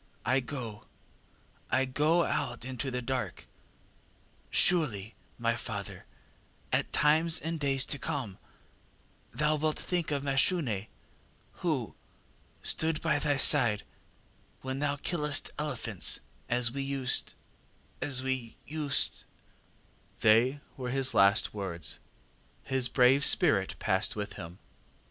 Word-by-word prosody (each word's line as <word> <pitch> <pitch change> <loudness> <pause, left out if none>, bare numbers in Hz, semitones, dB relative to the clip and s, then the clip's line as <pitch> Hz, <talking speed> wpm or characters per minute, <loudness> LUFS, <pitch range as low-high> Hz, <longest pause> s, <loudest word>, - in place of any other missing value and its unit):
I 130 +2 +3
go 120 -5 -6 0.8
I 130 +1 +2
go 150 +6 +2
out 120 -5 -2
into 130 0 -4
the 125 -1 -3
dark! 130 0 -3 1.0
Surely, 120 - +1 0.2
my - - 0
father, - - -6 0.7
at - - 0
times 160 +2 +4
in 165 0 -4
days 135 -2 +1
to 145 - -2
come 120 -8 -4 0.9
thou 150 +5 +1
wilt 155 +1 0
think 175 -3 -2
of 140 -2 -1
Mashune 135 - +1 0.7
who - - -1 0.7
stood 160 -1 +1
by - - +1
thy 145 -2 +1
side 120 -7 +5 0.8
when 130 +1 -4
thou 145 0 0
killest 150 -1 -1
elephants, - - 0 0.3
as 120 -1 +2
we 140 +2 -4
used 135 -2 +1 0.7
as 130 -3 +1
we 130 -3 -3
used 150 -2 +1 0.9
ŌĆÖ 110 - +5 0.3
ŌĆ£They - - -20 0.2
were 125 -2 -4
his 130 0 +1
last 100 0 +4
words, 95 -6 -3 0.6
his 130 -2 -1
brave 130 +2 +4
spirit - - +4
passed - - 0
with 105 -1 -5
him. 85 -2 -9
135 Hz, 115 wpm, -30 LUFS, 120-150 Hz, 1.0 s, side